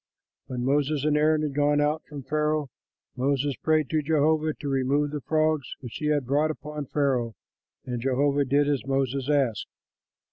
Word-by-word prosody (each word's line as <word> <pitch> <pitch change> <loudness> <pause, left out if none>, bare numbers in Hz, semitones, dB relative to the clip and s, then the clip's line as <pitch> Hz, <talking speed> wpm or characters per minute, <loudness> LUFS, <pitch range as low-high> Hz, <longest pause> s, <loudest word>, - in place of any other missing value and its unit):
When 125 -1 -3
Moses 145 +1 +1
and 150 -1 +2
Aaron 155 +1 +3
had 150 -2 -2
gone 145 +1 +2
out 150 +2 +1
from 145 -2 -8
Pharaoh, 150 -1 -1 0.4
Moses 140 +1 0
prayed 155 -2 +1
to 155 -1 +2
Jehovah 155 +1 +1
to 145 - -7
remove 140 +2 +1
the 150 -1 -4
frogs 155 -2 0
which 120 -3 -8
he 150 - -2
had 145 -3 +1
brought 145 +5 +2
upon 150 -2 -6
Pharaoh; 125 -6 0 0.5
and 125 -2 -4
Jehovah 140 +2 +1
did 140 +2 +2
as 145 -3 0
Moses 135 0 -1
asked. 135 -8 +1
145 Hz, 170 wpm, -26 LUFS, 135-150 Hz, 0.5 s, Aaron